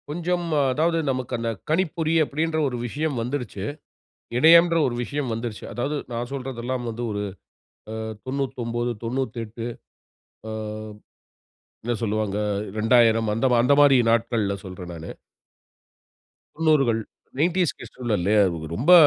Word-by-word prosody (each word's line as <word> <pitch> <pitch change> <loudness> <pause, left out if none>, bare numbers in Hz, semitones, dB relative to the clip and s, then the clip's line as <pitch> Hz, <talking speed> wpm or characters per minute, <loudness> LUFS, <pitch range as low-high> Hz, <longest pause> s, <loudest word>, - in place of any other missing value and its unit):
கொஞ்சம். 175 +3 -1 0.3
அதாவது, 165 +4 +2
நமக்கு 130 -1 -4
அந்த 115 0 -2 0.2
கணிப்பொறி, 165 -1 +1
அப்படின்ற 160 +3 -1
ஒரு 125 -2 -3
விஷயம் 145 +1 -2
வந்துடுச்சு. 120 -5 -3 0.7
இணையம்ன்ற 170 +4 +7
ஒரு 120 - -2
விஷயம் 140 -1 -3
வந்துடுச்சு. 115 -1 -5
அதாவது, 140 +5 -1 0.2
நான் 120 +1 -3
சொல்றதெல்லாம் 130 -2 -3
வந்து, 115 +2 -4
ஒரு 105 0 -2 0.7
அ - - -4 0.3
99, 120 -3 -2
98. 115 -2 -3 0.8
அ - - -4 1.3
என்ன 120 +1 0
சொல்லுவாங்க. 105 -2 0 0.4
2000 115 0 +4
அந்த 115 +5 +1 0.2
அந்த 125 +4 +5
மாரி 140 -2 +7
நாட்கள்ல 115 -3 +1
சொல்றேன், 90 -2 -8
நானு. 80 0 -8 1.5
90 155 -3 +4
கள். 115 -1 +1 0.4
90 175 +1 +2
கிட்ஸ் - - -12
ல - - +3
இல்லயா. 105 +4 +4 0.3
ரொம்ப 145 - +5
125 Hz, 120 wpm, -24 LUFS, 115-150 Hz, 1.5 s, இணையம்ன்ற